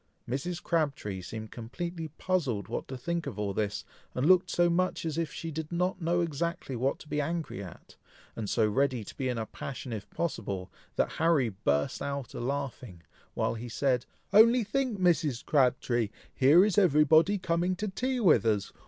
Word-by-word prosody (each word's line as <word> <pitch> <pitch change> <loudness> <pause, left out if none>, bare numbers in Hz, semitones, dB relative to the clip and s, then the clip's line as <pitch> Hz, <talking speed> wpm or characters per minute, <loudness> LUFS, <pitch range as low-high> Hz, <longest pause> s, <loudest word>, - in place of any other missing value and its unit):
Mrs. 165 +8 -3
Crabtree 140 - -1
seemed 110 +3 -7
completely 160 +8 -5
puzzled 145 - -1
what - - -4
to 130 - -6
think 170 +5 -3
of - - -5
all 100 -1 -1
this, 105 -1 -2 0.3
and 125 - 0
looked 185 +1 +5
so 175 +1 +3
much 175 0 0
as 160 - -2
if 165 -2 -1
she 165 +1 -5
did 155 +1 -5
not 180 +2 -1
know 170 +2 +1
exactly 170 -3 -2
what 130 +4 0
to - - -14
be 150 0 -1
angry 155 - -3
at, 90 - -12 0.4
and 110 -3 -4
so 110 -2 +3
ready 125 +2 +1
to - - -10
be 130 -2 -2
in 125 - -2
a 110 - -2
passion 130 +1 -7
if 105 -2 -6
possible, 100 - -3 0.2
that - - +1
Harry 160 -7 +3
burst 75 -8 -1
out 140 -2 -4
a - - -5
laughing, 125 -8 -4 0.3
while - - 0
he 120 +1 -6
said, 125 0 0 0.3
"Only 230 +3 +7
think 245 +1 -1
Mrs. 155 -7 +2
Crabtree! 125 -5 +2 0.2
here 150 +8 +6
is 210 -1 +3
every 150 -6 +5
body 160 +7 +5
coming 180 0 0
to 210 +3 -3
tea 255 +6 -1
with 190 -9 +5
us! 105 -3 0
145 Hz, 190 wpm, -29 LUFS, 115-175 Hz, 0.4 s, Only